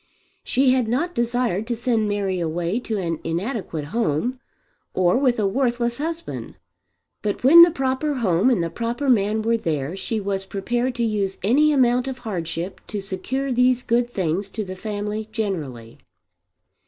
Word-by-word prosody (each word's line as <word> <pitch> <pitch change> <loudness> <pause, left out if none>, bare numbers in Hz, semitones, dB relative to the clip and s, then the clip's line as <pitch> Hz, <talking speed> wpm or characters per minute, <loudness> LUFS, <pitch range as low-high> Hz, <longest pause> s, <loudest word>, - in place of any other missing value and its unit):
She 265 0 +3
had 255 -3 +2
not 295 +10 0
desired 235 - 0
to 240 - -1
send 230 -3 0
Mary 195 -3 -1
away 170 +5 -1
to 225 -3 -3
an 165 -4 -2
inadequate 170 - -3
home, 235 - 0 0.6
or 180 -1 +3
with 255 -2 +2
a 210 - +2
worthless 240 +2 0
husband. 330 +2 -5 0.7
But 210 +1 -2
when 320 +7 +9
the 340 - +9
proper 270 0 -1
home 205 -2 +2
and 230 -9 +2
the 165 - -3
proper 240 +7 -1
man 215 -1 +2
were 230 +1 +2
there 160 -6 -2
she 220 +3 -3
was 195 -1 -3
prepared 240 +6 -1
to 240 - -1
use 205 -4 -1
any 285 +9 +4
amount 250 -2 +3
of 265 -1 -4
hardship 175 -6 -4
to 210 - -4
secure 245 +8 -3
these 250 0 +3
good 240 +1 +1
things 190 -2 -1
to 215 - 0
the 185 0 -6
family 210 +2 -4
generally. 150 - -4
220 Hz, 165 wpm, -23 LUFS, 190-250 Hz, 0.7 s, when